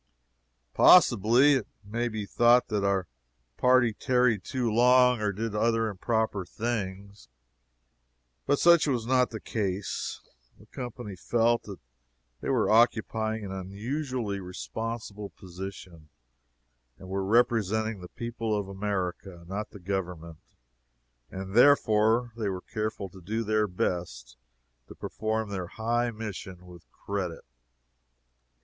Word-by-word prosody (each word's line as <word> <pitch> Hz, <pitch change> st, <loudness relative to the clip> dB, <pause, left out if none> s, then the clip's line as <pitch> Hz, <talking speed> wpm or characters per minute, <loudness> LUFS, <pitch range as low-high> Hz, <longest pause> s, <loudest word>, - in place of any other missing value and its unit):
Possibly 120 Hz, +8 st, +6 dB
it 110 Hz, -, -5 dB, 0.2 s
may 115 Hz, +4 st, -2 dB
be 110 Hz, -3 st, -4 dB
thought 120 Hz, +4 st, +4 dB
that 105 Hz, -2 st, -1 dB
our 100 Hz, -2 st, +1 dB, 0.5 s
party 125 Hz, -3 st, +4 dB
tarried 125 Hz, -4 st, +1 dB
too 125 Hz, -1 st, -2 dB
long, 125 Hz, +1 st, +5 dB
or 105 Hz, -1 st, +1 dB
did 110 Hz, +2 st, -4 dB
other 115 Hz, +1 st, +1 dB
improper 110 Hz, 0 st, -1 dB
things, 100 Hz, -2 st, -5 dB, 1.2 s
but 145 Hz, -, +3 dB
such 170 Hz, 0 st, +5 dB
was 125 Hz, -5 st, 0 dB
not 125 Hz, 0 st, +3 dB
the 110 Hz, -, -6 dB
case. 100 Hz, -3 st, -3 dB, 0.4 s
The 105 Hz, -, -18 dB
company 120 Hz, -3 st, -7 dB
felt 115 Hz, +5 st, +1 dB
that 100 Hz, -3 st, -8 dB, 0.6 s
they -, -, -4 dB
were 125 Hz, -5 st, +2 dB
occupying 110 Hz, -1 st, +2 dB
an 95 Hz, -, -6 dB
unusually 105 Hz, +3 st, -4 dB
responsible 105 Hz, +2 st, -6 dB
position 90 Hz, -3 st, -10 dB, 0.9 s
they -, -, -12 dB
were 95 Hz, +1 st, -3 dB
representing 110 Hz, -1 st, +1 dB
the 90 Hz, -, -9 dB
people 115 Hz, -2 st, -3 dB
of 100 Hz, -2 st, -3 dB
America, 95 Hz, -2 st, -4 dB
not 105 Hz, +3 st, -4 dB
the 100 Hz, -, -12 dB
Government 90 Hz, -4 st, -4 dB, 0.9 s
and 95 Hz, 0 st, -7 dB
therefore 115 Hz, -2 st, +4 dB
they 110 Hz, -3 st, -2 dB
were 95 Hz, -1 st, -4 dB
careful 110 Hz, -2 st, -4 dB
to 95 Hz, +1 st, -14 dB
do 110 Hz, +6 st, -2 dB
their 110 Hz, 0 st, +1 dB
best 85 Hz, -10 st, -3 dB, 0.5 s
to -, -, -12 dB
perform 110 Hz, 0 st, -3 dB
their 95 Hz, -3 st, -4 dB
high 120 Hz, +4 st, -1 dB
mission 100 Hz, -5 st, -7 dB
with 90 Hz, -2 st, -15 dB
credit. 95 Hz, -5 st, -5 dB
105 Hz, 125 wpm, -28 LUFS, 95-115 Hz, 1.2 s, Possibly